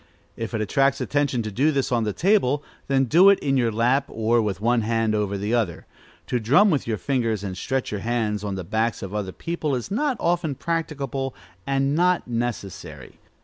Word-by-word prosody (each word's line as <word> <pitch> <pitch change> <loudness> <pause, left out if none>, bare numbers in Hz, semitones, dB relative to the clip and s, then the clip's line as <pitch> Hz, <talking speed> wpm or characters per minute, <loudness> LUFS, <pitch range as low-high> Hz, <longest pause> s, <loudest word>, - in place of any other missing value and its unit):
If 115 +1 -4
it 110 - -1
attracts 135 +6 +2
attention 140 -5 0
to 110 - -4
do 140 +9 +2
this 135 -3 -1
on 120 -2 +1
the 105 - 0
table, 145 - +2 0.2
then 135 -1 +3
do 175 +10 +6
it 200 - +6
in 135 -1 0
your 120 -3 +2
lap, 125 +5 +2
or 115 +1 +1
with 100 -3 -2
one 120 +2 +2
hand 115 0 0
over 105 -2 -1
the 105 +4 -2
other. 110 -9 -1 0.4
To 125 - -1
drum 145 - +4
with 145 -6 0
your 110 -2 -1
fingers 115 -5 -1
and 95 -2 -4
stretch 130 +6 -2
your 105 -2 -3
hands 110 -3 -1
on 100 -2 -3
the 95 - -4
backs 110 +6 -1
of 95 0 -6
other 100 -3 -3
people 160 - -3
is 125 +9 -5
not 265 +3 0
often 170 -4 0
practicable, 140 -5 -3 0.3
and 135 0 +1
is - - 0
not 180 0 +2
necessary. 115 -5 -5
120 Hz, 205 wpm, -24 LUFS, 110-140 Hz, 0.4 s, do